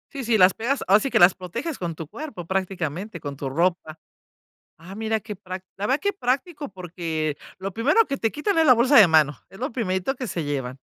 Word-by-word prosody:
Sí, 275 -3 -5
sí, 225 -1 +3
las 185 -1 +6
pegas, 245 +5 -1
ahora 200 +2 +7
sí 275 - -2
que - - +2
las 175 +1 +7
proteges 185 - -5
con 170 -2 -4
tu 160 - -7
cuerpo, 225 - -8
prácticamente, 185 -1 -3
con 140 -1 -6
tu 140 - -4
ropa, 165 +1 -1 0.8
ah, 170 +4 -11
mira 220 +1 -1
qué 210 0 -8
prac 185 -1 -8
la 200 - -1
verdad 265 +5 +2
qué 405 0 0
práctico, 290 -1 -2
porque, 165 -5 -4 0.2
lo 190 +1 -5
primero 280 - +3
que 275 -1 -3
te 225 - 0
quitan 330 - -1
es 320 - +4
la 255 - +8
bolsa 255 +5 +4
de 210 - +9
mano, 150 -4 +3
es 195 - -15
lo 255 +2 -3
primerito 205 +1 -1
que 255 -1 -5
se 170 -7 -3
llevan. 135 -3 -4
195 Hz, 225 wpm, -24 LUFS, 170-255 Hz, 0.8 s, de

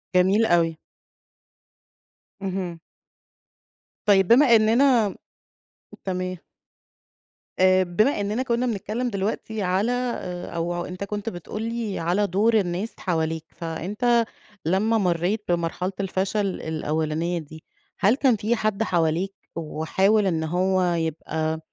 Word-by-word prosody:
جميل 190 +5 +4
أوي. 165 -4 +2 1.6
اهم. 185 -3 -3 1.3
طيب 195 -3 +5
بما 240 0 +7
إننا 225 -1 +4 0.9
تمام. 185 -1 -2 1.2
آآ، 185 0 +5
بما 210 +8 +1
إننا 210 +5 -1
كنا 245 0 0
بنتكلّم 225 +2 -2
دلوقتي 215 +1 -3
على 190 +5 +1
آآ، 240 -8 -3
أو 175 +1 -2
أنت 180 +2 -6
كنت 205 +2 -3
بتقول 195 +3 -7
لي 230 -3 -3
على 180 +5 +1
دُور 205 +6 +2
الناس 190 +3 -2
حواليك، 160 -3 -1
فأنت 210 +9 0 0.4
لمّا 210 +6 +2
مرّيت 185 +2 0
بمرحلة 175 +2 -1
الفشل 195 +1 0 0.2
الأولانية 160 +2 -1
دي 155 +1 -11 0.4
هل 210 +5 +4
كان 265 -3 +3
في 215 +3 0
حَد 215 -1 0
حواليك 175 0 0 0.2
وحاول 190 +6 +1
إن 160 -3 0
هو 185 +3 +1
يبقى 160 -1 -2
190 Hz, 110 wpm, -24 LUFS, 170-215 Hz, 1.6 s, بما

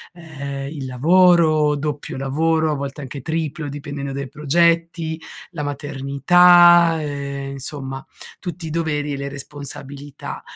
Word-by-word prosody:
ehm, 140 -5 -6
il 140 -2 -6
lavoro, 155 +2 +4
doppio 145 -2 -4
lavoro, 160 +4 +1
a - - 0
volte 140 +1 -5
anche 140 0 -7
triplo, 160 0 -3
dipendente 145 -1 -6
dai 140 0 -4
progetti, 165 +2 +1 0.3
la 160 -5 -5
maternità, 165 +5 +5
ehm, 140 -2 -4
insomma, 135 -1 -6 0.4
tutti 175 -2 -6
i - - -4
doveri 150 -3 -1
e 140 - -3
le 140 0 -4
responsabilità. 140 0 -8
145 Hz, 125 wpm, -21 LUFS, 140-165 Hz, 0.4 s, maternità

